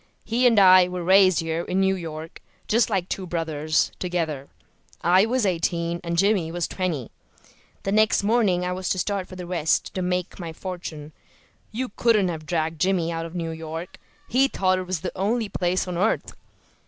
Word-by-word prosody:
He 240 +3 +3
and 230 -3 +3
I 185 -2 +7
were 180 -1 -5
raised 185 0 +5
here 165 0 -2
in 180 +2 -2
New 190 0 +3
York, 160 -2 -7 0.3
just 230 +1 +2
like 190 -4 -1
two 190 -1 -4
brothers, 155 -3 0
together. 160 -6 -3 0.5
I 185 +5 +5
was 250 -1 +1
eighteen 170 -1 -1
and 170 0 -2
Jimmy 195 -3 +2
was 175 0 -2
twenty. 170 - -3 0.7
The 195 - -1
next 215 0 +3
morning 200 -5 +2
I 180 - -1
was 185 0 -3
to - - 0
start 195 0 -2
for 185 - -10
the 180 -1 -7
West 170 -3 0
to 185 - -3
make 180 +1 -2
my 165 -2 -6
fortune. 160 -4 -7 0.6
You 250 +3 -3
couldn't 215 -6 +3
have 155 -2 -6
dragged 160 -2 -2
Jimmy 180 -3 +1
out 165 0 -3
of 165 - -12
New 165 -2 -3
York; 160 +2 -7 0.3
he 265 +3 +3
thought 185 -7 +1
it 185 - -6
was 180 -3 -2
the 180 - -5
only 215 +3 0
place 185 0 -1
on 175 -1 -3
earth. 215 +4 0
180 Hz, 190 wpm, -24 LUFS, 165-195 Hz, 0.7 s, I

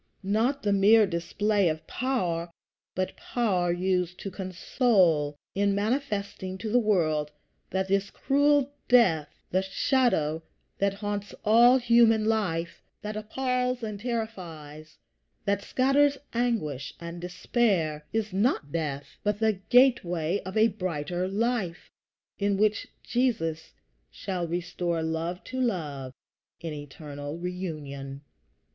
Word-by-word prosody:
Not 225 +8 +1
the 205 -1 +2
mere 210 +3 +6
display 195 +2 +1
of 155 0 -4
power, 180 -11 -1 0.5
but 185 0 -2
power 190 -8 0
used 180 0 0
to 195 - -5
console, 185 - +1 0.2
in 200 0 +1
manifesting 205 -4 -2
to 215 +3 -4
the 245 - +5
world 160 -9 +1 0.4
that 190 0 -1
this 195 +1 +1
cruel 285 0 +2
death 175 -12 +4 0.2
the 185 - +2
shadow 190 - +1 0.4
that 200 0 +1
haunts 205 0 -4
all 235 +4 +7
human 235 -3 +4
life, 185 -7 -1 0.2
that 210 0 -4
appalls 250 +3 -1
and 210 -2 -4
terrifies, 170 -10 -6 0.5
that 200 0 +1
scatters 275 +5 +3 0.2
anguish 220 - -1
and 170 0 -7
despair 180 -4 0
is 215 -2 -2
not 195 - +1
death, 145 -3 -2 0.2
but 210 -1 0
the 220 -3 +1
gateway 195 -9 +3
of 190 +2 -5
a 220 +1 +5
brighter 180 -3 -3
life, 205 -3 -2 0.5
in 200 -1 +1
which 215 +1 +1 0.2
Jesus 165 -11 -1 0.4
shall 180 -3 -4
restore 175 -1 -2
love 165 +3 -3
to 255 0 -4
love, 150 - -2 0.5
in 165 -2 -5
eternal 145 +1 -7
reunion. 150 -7 -5
195 Hz, 120 wpm, -27 LUFS, 165-225 Hz, 0.5 s, all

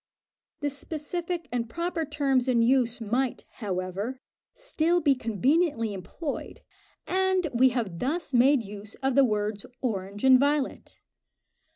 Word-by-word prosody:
The 290 0 0
specific 330 +3 -4
and 235 -2 -2
proper 335 +2 -2
terms 275 -4 +1
in 240 -2 +3
use 245 -1 +2
might, 240 +3 -1
however, 200 +4 -3 0.4
still 350 -9 +1
be 290 -4 +4
conveniently 245 - +1
employed, 195 - -6 0.4
and 375 -2 +1
we 255 +2 +5
have 220 -9 -3
thus 300 +3 -2
made 255 +1 +5
use 205 +1 -9
of 270 0 +2
the 275 +2 +6
words 210 -3 -1 0.2
orange 200 -4 -3
and 260 -1 +7
violet. 285 0 -1
260 Hz, 130 wpm, -27 LUFS, 225-300 Hz, 0.4 s, and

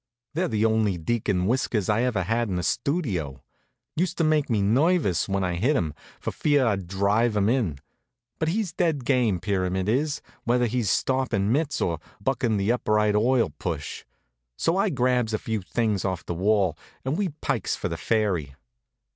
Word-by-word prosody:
They're 175 +4 0
the 110 -6 +1
only 110 -4 +2
deacon 95 0 0
whiskers 110 -3 0
I 105 +2 +2
ever 120 -7 +1
had 115 +4 0
in 95 - -1
the 90 - -1
Studio. 95 - -1 0.5
Used 175 +2 -1
to 165 - +2
make 155 -3 +2
me 110 -3 +2
nervous 130 - +2
when 95 0 0
I 90 -1 0
hit 130 - +2
'em, 80 - 0 0.3
for - - -3
fear 145 -3 +2
I'd 100 -6 0
drive 105 +4 +1
'em 100 0 +2
in. 115 - 0 0.6
But 160 - 0
he's 185 0 -1
dead 160 -7 0
game, 120 -9 +2
Pyramid 95 -1 -1
is, 140 +7 0 0.2
whether 125 0 +2
he's 120 -3 0
stoppin' 130 -6 +1
mitts, 145 +2 0
or 85 -2 0 0.2
buckin' 120 -1 0
the 100 +3 +1
Upright 105 -3 +2
Oil 115 - +3
push. 80 -5 -4 0.5
So 165 - +1
I 200 +2 +2
grabs 125 -6 +1
a - - 0
few 110 -1 -3
things 105 +1 -1
off 95 -3 -2
the - - -3
wall, 95 -1 +2 0.3
and 135 +3 0
we 195 0 0
pikes - - -1
for - - -3
the - - -3
ferry. 95 - 0
110 Hz, 180 wpm, -25 LUFS, 95-130 Hz, 0.6 s, Oil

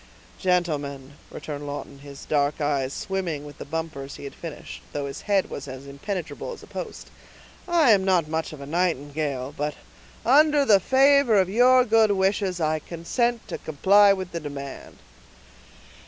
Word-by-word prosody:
"Gentlemen," 145 -7 -1 0.2
returned 145 -1 -7
Lawton, 140 -1 -7
his 140 0 -11
dark 145 -1 0
eyes 140 -3 0
swimming 175 -5 -3
with 145 -1 -12
the - - -6
bumpers 150 -3 -5
he - - -11
had 140 - -7
finished, 165 -3 -9
though 145 -1 -2
his 140 - -6
head 195 -2 +2
was - - -6
as 130 +1 -8
impenetrable 175 - -5
as - - -12
a - - -10
post; - - -8 0.6
"I 335 -8 +4
am 200 -3 +4
not 180 -5 +2
much 160 +1 -2
of 155 - -10
a - - -7
nightingale, 145 -4 -2
but, 150 0 -2 0.5
under 290 +3 +5
the 205 -6 +6
favor 265 -1 +4
of 185 -1 +2
your 250 +3 +5
good 225 -1 +4
wishes, 190 -1 +1
I 155 -1 +1
consent 225 - -2
to - - -5
comply 200 +7 +4
with 185 -2 -2
the 170 - -3
demand." 140 -3 -8
165 Hz, 165 wpm, -25 LUFS, 145-200 Hz, 0.6 s, the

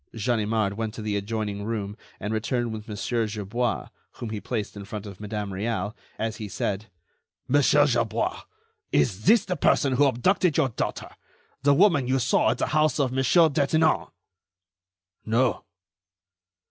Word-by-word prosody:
Ganimard 110 -3 0
went 110 -1 -3
to 110 - -6
the 105 -1 -1
adjoining 100 0 -3
room 105 -2 -3 0.2
and 105 +2 -3
returned 115 +1 -1
with 110 0 -7
Mon. 110 +2 -1
Gerbois, 110 +2 -2 0.2
whom 115 -3 -6
he 105 -2 -4
placed 110 -5 -4
in 100 - -7
front 105 0 -7
of 100 -2 -9
Madame 105 -1 -4
Réal, 105 +1 -2 0.2
as 110 0 -3
he 110 -3 -5
said: 100 +2 -3 0.6
"Monsieur 145 +1 +4
Gerbois, 120 -6 0 0.5
is 90 +8 +1
this 225 +4 +5
the 180 - -2
person 140 -5 +2
who 140 +3 +4
abducted 160 - +2
your 145 -5 +3
daughter, 115 - -4 0.5
the 140 0 +4
woman 155 -7 +4
you 130 +1 +2
saw 130 0 +2
at - - 0
the - - 0
house 155 -2 +2
of 135 -3 +1
Monsieur 130 +6 +4
Detinan?" 155 +2 +2 1.2
"No." 115 +1 +1
115 Hz, 155 wpm, -25 LUFS, 105-135 Hz, 1.2 s, this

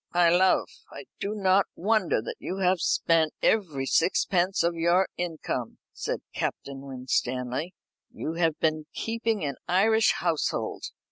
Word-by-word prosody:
"My 175 -1 +5
love, 185 +2 +3 0.2
I - - -9
do 205 +2 -3
not 195 -1 +3
wonder 195 - +1
that - - -6
you 185 - -5
have 185 -1 +2
spent 160 -2 +2
every 160 -11 +1
sixpence 180 +4 +2
of 170 0 +1
your 170 +3 +2
income," 160 -8 -4 0.2
said - - -3
Captain 140 -1 -4
Winstanley. 130 +3 -2 0.4
"You 160 - -4
have 165 -2 0
been 155 -1 0
keeping 225 -5 -1
an 140 -2 -3
Irish 220 +5 +4
household. 170 -4 -2
170 Hz, 135 wpm, -27 LUFS, 155-190 Hz, 0.4 s, My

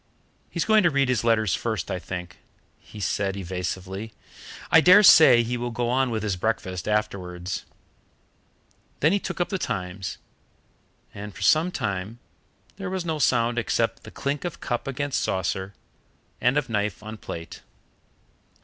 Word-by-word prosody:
"He's 170 - -2
going 220 0 +5
to 175 - +4
read 140 -3 +1
his 125 -4 +1
letters 110 -5 +2
first, 110 -3 -2
I 90 - -2
think," 90 -1 -7 0.4
he 105 - -13
said 100 0 -1
evasively; 95 +3 -5 0.6
"I 165 - +8
dare 185 +5 +8
say 135 - +8
he 120 +1 -2
will 120 0 -3
go 120 0 -2
on 130 0 +2
with 110 -2 -2
his 100 -3 0
breakfast 95 -3 -2
afterwards." 95 -4 -2 1.3
Then 155 - +4
he 200 - +2
took - - -5
up 175 - 0
the 190 - -2
TIMES, 95 - -4 1.0
and 105 0 -8
for - - -6
some 160 +3 +4
time 105 - -3 0.6
there 195 -2 -4
was 185 -2 -3
no 160 -2 -2
sound 120 -2 +2
except 115 0 0
the - - -11
clink 140 +1 -3
of 175 -3 -5
cup 120 +2 -3
against 140 +1 -1
saucer 95 +1 -2 0.7
and 125 +4 +3
of 145 -3 0
knife 105 -4 -2
on 110 +1 -7
plate. 85 -5 -8
115 Hz, 160 wpm, -25 LUFS, 95-140 Hz, 1.3 s, I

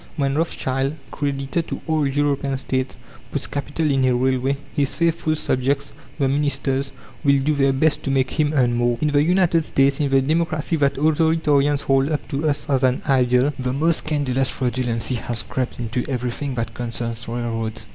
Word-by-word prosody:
When 140 -2 +1
Rothschild, 135 -3 -1 0.2
creditor 140 +2 -2
to - - -6
all 155 -3 +1
European 140 -1 0
States, 130 0 -2 0.3
puts - - -2
capital 145 +2 -2
in 135 -1 +2
a 125 -1 +3
railway, 130 +2 +1 0.2
his 140 -1 0
faithful 165 0 +1
subjects, 140 0 -1 0.2
the 140 -3 +2
ministers, 135 -1 0 0.3
will 140 -2 +4
do 145 +3 +1
their 135 -1 +3
best 145 +4 +1
to - - -1
make 130 -1 +1
him 150 -2 +1
earn 125 -3 +3
more. 120 0 +1
In 150 - +1
the 145 0 +3
United 170 0 +3
States, 135 -2 +2
in 145 -2 +1
the 135 0 +4
Democracy 160 +2 0
that 140 -2 +2
authoritarians 150 -1 +2
hold 135 +1 +2
up 150 - -2
to 150 +3 0
us 145 - -2
as 135 -2 +1
an 130 -1 +2
ideal, 130 0 +3
the 125 0 -1
most 160 +4 +2
scandalous 135 -4 0
fraudulency 125 -1 -1
has 115 0 -3
crept 130 -1 -3
into 120 +1 -2
everything 125 +1 -3
that 115 -2 -3
concerns 115 -1 -5
railroads. 115 -1 -3
135 Hz, 175 wpm, -22 LUFS, 130-150 Hz, 0.3 s, will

